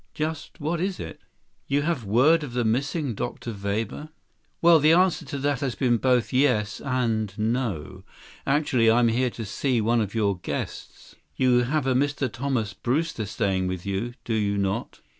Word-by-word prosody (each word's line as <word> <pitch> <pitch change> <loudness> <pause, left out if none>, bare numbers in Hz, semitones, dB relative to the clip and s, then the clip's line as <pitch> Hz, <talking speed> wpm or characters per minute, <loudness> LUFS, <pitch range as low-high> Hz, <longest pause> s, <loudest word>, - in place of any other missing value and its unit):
Just 155 0 -4
what 160 +2 -1
is 190 0 -2
it? - - -7 0.5
You 140 +1 +1
have 155 -6 -1
word 130 +11 +4
of 130 -5 -7
the 120 -1 0
missing 135 +4 0
Dr. 120 +1 -5
Weber?" 105 +8 -3 0.5
"Well, 170 -1 +6
the 155 +2 +5
answer 180 +1 +3
to 145 - -5
that 140 -1 0
has 135 -5 -2
to 125 0 +1
be - - +5
both 125 +1 +1
yes 125 -6 +2
and 115 -6 -1
no. 105 - -2 0.4
Actually, 135 -5 +3
I'm 120 +1 +4
here 125 +3 +1
to 115 -1 -7
see 125 +4 0
one 115 +2 +2
of 105 0 -4
your 100 -4 +1
guests. - - -6 0.2
You 125 -1 +3
have 150 +2 0
a 130 - +2
Mr. 140 -1 0
Thomas 125 -6 -1
Brewster 125 - -1
staying 95 -3 0
with 90 0 -4
you, 100 +5 -3
do 115 - -2
you 100 -2 0
not?" 100 -1 -2
120 Hz, 180 wpm, -25 LUFS, 110-145 Hz, 0.5 s, Well